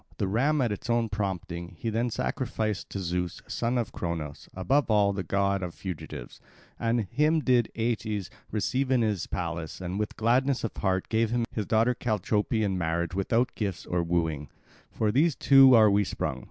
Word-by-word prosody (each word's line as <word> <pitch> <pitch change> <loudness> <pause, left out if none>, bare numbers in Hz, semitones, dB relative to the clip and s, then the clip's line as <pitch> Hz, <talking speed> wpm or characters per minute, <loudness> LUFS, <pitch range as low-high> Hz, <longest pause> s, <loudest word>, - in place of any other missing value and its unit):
The 100 - 0
ram, 135 +9 +2
at 120 -4 +1
its 105 +4 -5
own 120 -1 +2
prompting, 90 -4 -4
he 115 - -3
then 115 +3 0
sacrificed 110 -3 -2
to 100 - -4
Zeus, 90 -1 -2
son 120 +1 -1
of 120 -3 -1
Cronos, 80 -4 -5
above 135 +9 +1
all, 100 -2 +3
the 100 - -2
god 100 +2 0
of 90 -2 -5
fugitives. 85 -9 -7 0.4
And 115 0 +1
him 150 - +1
did 125 -5 +2
Aeetes 110 -4 -2 0.2
receive 130 +5 -1
in 130 -3 +3
his 105 -5 -1
palace, 85 -2 -4
and 95 +2 -4
with 105 - -3
gladness 125 +4 +2
of 115 - -3
heart 95 -1 0
gave 110 0 +2
him 120 0 0
his 105 -3 -3
daughter 115 +3 +3
Chalciope 110 0 0
in 95 -3 0
marriage 85 0 -1
without 115 +6 +1
gifts 100 -5 -3
of 85 -1 -1
wooing. 80 -5 -1 0.4
From 110 -2 0
those 145 +5 +3
two 135 -2 +7
are 110 -2 +6
we 100 +1 +3
sprung. - - -3
105 Hz, 180 wpm, -27 LUFS, 90-120 Hz, 0.4 s, two